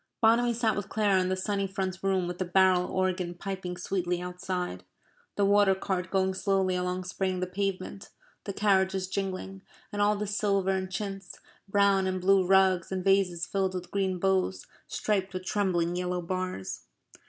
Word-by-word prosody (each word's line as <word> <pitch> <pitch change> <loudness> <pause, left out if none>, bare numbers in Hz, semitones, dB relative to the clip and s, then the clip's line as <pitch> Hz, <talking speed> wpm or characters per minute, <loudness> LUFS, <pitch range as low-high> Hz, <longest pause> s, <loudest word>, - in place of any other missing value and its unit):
Bonamy 235 +2 +4
sat 225 -1 +1
with 205 0 -4
Clara 205 -3 +2
in 185 - -1
the 185 - +1
sunny 195 +1 -1
front 190 -1 -3
room 190 -2 +1
with 180 0 -5
the - - +1
barrel 185 0 +4
organ 185 -2 -1
piping 185 -1 -5
sweetly 180 -1 -1
outside; 180 - -4 0.5
the 200 - +2
water 200 -1 +5
cart 185 -1 -2
going 190 -1 +1
slowly 190 -1 +1
along 180 0 -1
spraying 185 0 -2
the 185 - 0
pavement; 195 +1 -4 0.4
the 200 - -3
carriages 190 -2 +2
jingling, 190 0 -4 0.3
and 205 -1 -2
all 205 +1 +4
the 210 +1 -3
silver 200 -2 +1
and 190 -1 -2
chintz, 195 -2 -5 0.3
brown 200 -1 +3
and 185 0 -1
blue 190 +1 +4
rugs 190 -1 +3
and 185 -1 -2
vases 190 -3 +2
filled 190 -1 -1
with 180 -1 -6
green 190 -2 0
boughs, 185 - 0 0.2
striped 195 -3 -1
with 185 0 -4
trembling 175 -4 0
yellow 180 0 -1
bars. 185 - -4
190 Hz, 170 wpm, -28 LUFS, 180-195 Hz, 0.5 s, water